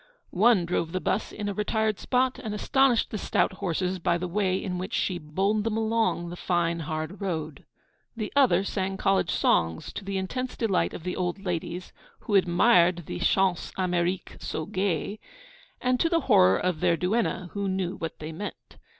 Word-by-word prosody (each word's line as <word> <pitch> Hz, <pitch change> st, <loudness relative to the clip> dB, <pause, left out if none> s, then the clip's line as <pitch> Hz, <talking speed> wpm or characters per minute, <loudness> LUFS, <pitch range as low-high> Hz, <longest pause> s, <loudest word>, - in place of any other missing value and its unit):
One 200 Hz, -1 st, +4 dB
drove 170 Hz, -1 st, -1 dB
the 185 Hz, -, 0 dB
bus 205 Hz, -, -1 dB
in 210 Hz, -1 st, -5 dB
a 205 Hz, -, -1 dB
retired 215 Hz, +1 st, 0 dB
spot 255 Hz, 0 st, +1 dB
and 215 Hz, -3 st, -4 dB
astonished 265 Hz, +2 st, +2 dB
the 215 Hz, -, -3 dB
stout -, -, +1 dB
horses 185 Hz, 0 st, -1 dB
by 175 Hz, 0 st, +1 dB
the 180 Hz, +1 st, -3 dB
way 190 Hz, 0 st, +1 dB
in 180 Hz, -2 st, -3 dB
which 190 Hz, +4 st, -4 dB
she 180 Hz, -2 st, 0 dB
bowled 195 Hz, +8 st, 0 dB
them 225 Hz, 0 st, -1 dB
along 220 Hz, -6 st, 0 dB
the 175 Hz, -, -6 dB
fine, 170 Hz, -2 st, 0 dB
hard 155 Hz, +5 st, -4 dB
road. 160 Hz, -6 st, -4 dB, 0.5 s
The 215 Hz, -2 st, -4 dB
other 240 Hz, -10 st, +4 dB
sang 195 Hz, -1 st, -2 dB
college 195 Hz, -4 st, +2 dB
songs, 80 Hz, -, +1 dB
to -, -, -6 dB
the 195 Hz, 0 st, -3 dB
intense 250 Hz, +7 st, -3 dB
delight 215 Hz, -6 st, +1 dB
of -, -, -8 dB
the 180 Hz, 0 st, -3 dB
old 180 Hz, +2 st, -3 dB
ladies, 175 Hz, 0 st, -4 dB, 0.3 s
who 210 Hz, -, -4 dB
admired 175 Hz, -2 st, +4 dB
the 90 Hz, -, -5 dB
'chants 190 Hz, -2 st, +1 dB
Amériques 180 Hz, 0 st, -1 dB
so 155 Hz, -, -3 dB
gay,' 190 Hz, +3 st, -2 dB, 0.6 s
and 250 Hz, 0 st, +1 dB
to 330 Hz, -, +2 dB
the 335 Hz, -1 st, +2 dB
horror 95 Hz, -, +5 dB
of 180 Hz, -4 st, -1 dB
their 170 Hz, -, +2 dB
duenna, 185 Hz, -1 st, -1 dB
who 200 Hz, -1 st, -2 dB
knew 190 Hz, -1 st, -1 dB
what 165 Hz, -1 st, -5 dB
they 155 Hz, +1 st, -6 dB
meant. 205 Hz, +6 st, -8 dB
185 Hz, 185 wpm, -27 LUFS, 175-210 Hz, 0.6 s, horror